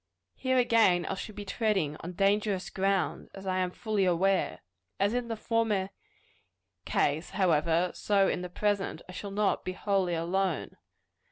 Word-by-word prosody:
_ - - -56 0.3
Here 260 -1 0
again 225 -8 +4
I - - -2
shall 205 +2 -7
be 205 0 -6
treading 195 -8 0
on 175 +2 -7
dangerous 200 +1 +1
ground, 195 -1 0
as 195 0 -9
I 185 -1 0
am 185 -1 +1
fully 210 +1 -1
aware. 185 +1 +1 0.4
As 200 +3 +2
in 245 -1 -1
the 230 - -2
former 215 -4 0 1.0
ease, 150 +4 +1
however, 170 -2 +2
so 200 -2 +2
in - - -1
the 180 - -5
present, 205 +1 -1
I - - -9
shall 200 +2 -6
not 205 +1 0
be 185 - -3
wholly 190 -3 0
alone. 180 +1 -1
195 Hz, 165 wpm, -29 LUFS, 180-210 Hz, 1.0 s, again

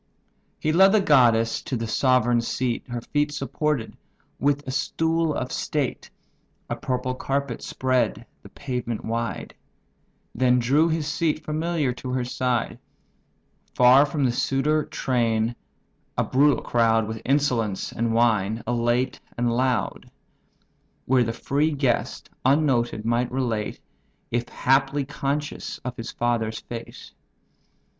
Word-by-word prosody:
He 155 - 0
led 190 +4 +6
the 215 - +5
goddess 120 - +4
to 130 - -3
the 115 - -3
sovereign 120 0 +2
seat, 120 0 -2
Her 120 -1 -4
feet 145 +4 0
supported 145 -2 -2 0.4
with 145 0 +1
a - - -2
stool 160 +4 0
of 125 - -3
state 145 -5 -2 0.6
(A - - 0
purple 130 0 -2
carpet 135 -1 -2
spread 125 -3 -1 0.2
the - - -13
pavement 125 -4 -4
wide); 115 0 -3 0.8
Then 125 +1 +3
drew 140 +7 +3
his 160 -1 -1
seat, 155 +1 -1
familiar, 155 -3 -1
to 125 +1 -7
her 130 -1 0
side; 125 -2 -1 1.0
Far 130 +4 +6
from 145 0 -1
the 125 - +3
suitor 145 +5 +1
train, 115 -2 0 0.6
a - - +3
brutal 145 +2 +3
crowd, 115 -2 +2
With 110 0 -5
insolence, 125 -7 0
and 115 0 -1
wine, 115 -2 +2
elate 120 +2 0 0.2
and 120 0 +1
loud: 125 -1 -1 1.0
Where 130 -1 +3
the 115 - -2
free 140 +6 0
guest, 135 -5 -1 0.2
unnoted, 130 -6 +2
might 120 +2 +1
relate, 120 -5 -2 0.5
If 120 0 -1
haply 135 +1 +1
conscious, 145 +1 -3
of 125 -1 -4
his 115 -3 -6
father's 115 -2 -1
fate. 115 -1 -9
125 Hz, 130 wpm, -24 LUFS, 120-145 Hz, 1.0 s, led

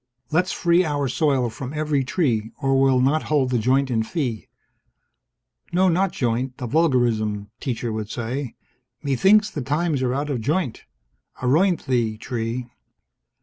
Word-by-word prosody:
Let's 180 +4 +2
free 175 0 +3
our 145 -4 -1
soil 130 -3 +1
from 125 +4 -7
every 150 -2 0
tree 125 - 0
or 135 -2 +2
we'll 135 -2 +4
not 145 +5 +2
hold 140 -4 +2
the 125 - +2
joint 130 +4 +2
in 115 -2 +1
fee. 120 - -3 1.2
No, 185 +2 +3
not 185 +2 +2
joint. 125 +1 -1
A 125 - -5
vulgarism, 115 -8 +1
teacher 120 -3 -3
would 110 -1 -4
say. 125 +2 -4 0.5
Methinks 195 - +4
the 150 - -4
times 150 +2 0
are 125 0 0
out 145 +1 -2
of 125 -5 -2
joint. 145 +1 -1 0.6
Aroint 165 +7 +2
thee, 120 -5 0
tree! 120 +1 -4
135 Hz, 145 wpm, -23 LUFS, 120-155 Hz, 1.2 s, we'll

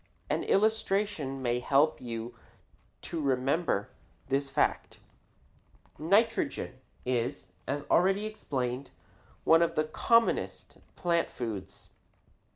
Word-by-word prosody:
An - - 0
illustration 195 -9 +1
may 120 0 +1
help 140 +5 +3
you 115 0 -5 0.7
to 165 - -3
remember 135 - +1 0.4
this 135 +1 0
fact. - - 0 1.0
Nitrogen 195 - +1 0.3
is, 120 -6 -1 0.2
as 145 +1 -2
already 195 +4 +3
explained, 135 - -3 0.5
one 165 +1 +6
of 170 - +1
the 155 - +3
commonest 230 +9 +1 0.2
plant 170 -2 +1
foods. 110 -6 -6
145 Hz, 95 wpm, -30 LUFS, 125-180 Hz, 1.0 s, one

